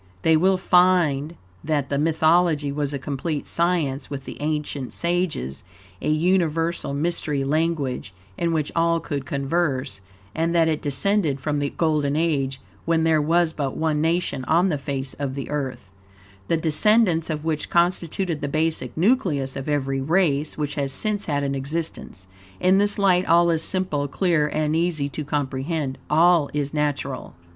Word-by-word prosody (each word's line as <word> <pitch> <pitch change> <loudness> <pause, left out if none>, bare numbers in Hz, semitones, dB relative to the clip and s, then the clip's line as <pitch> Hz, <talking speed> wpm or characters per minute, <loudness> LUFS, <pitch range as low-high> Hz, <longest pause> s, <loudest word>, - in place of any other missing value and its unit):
They 160 - +5
will 185 +4 +3
find 175 -5 +3 0.3
that 145 -3 -1
this 140 - +1
mythology 160 -1 +2
was 145 0 -2
a 140 - -2
complete 145 +2 -3
science 160 -6 0
with 135 -2 -6
the - - -7
ancient 150 -3 -3
sages, 170 - -2 0.4
a - - -1
UNIVERSAL 165 -2 +1
MYSTERY 150 -2 -1
LANGUAGE, 145 -6 -1 0.2
in 170 -1 -1
which 155 -3 -1
all 165 0 +2
could 145 -4 -5
converse, 140 - -1 0.3
and 165 +1 0
that 165 -1 +4
it 155 -2 0
descended 145 +1 0
from 145 +2 -2
the 145 0 -1
Golden 150 -3 0
Age, 140 -5 0 0.3
when 165 -1 +2
there 160 -1 +3
was 165 +2 +2
but 140 -4 -3
ONE 155 -2 0
nation 165 -4 0
on 175 +6 +3
the 150 -4 -1
face 135 -1 -3
of 135 -2 -3
the 140 - -5
Earth, 130 -9 -4 0.6
the 165 - +2
descendants 170 +2 +3
of 155 -1 -3
which 155 -2 -2
constituted 175 -1 0
the 145 - -2
basic 155 +3 -1
nucleus 165 - +1
of 135 +2 -5
every 135 -2 0
race 155 -1 +1
which 145 -1 -2
has 140 -2 -2
since 210 +6 -1
had 145 -2 -1
an 140 0 -1
existence. 140 - -5 0.3
In 185 +2 +4
this 205 0 +2
light 185 -2 +3
all 170 +1 +5
is 160 -1 0
simple, 165 -6 -1
clear, 165 -1 +1
and 155 0 -1
easy 165 -4 0
to 150 - -5
comprehend 140 0 -2
all 165 -1 +4
is 145 -1 -2
natural. 145 -3 -2
155 Hz, 160 wpm, -23 LUFS, 140-170 Hz, 0.6 s, They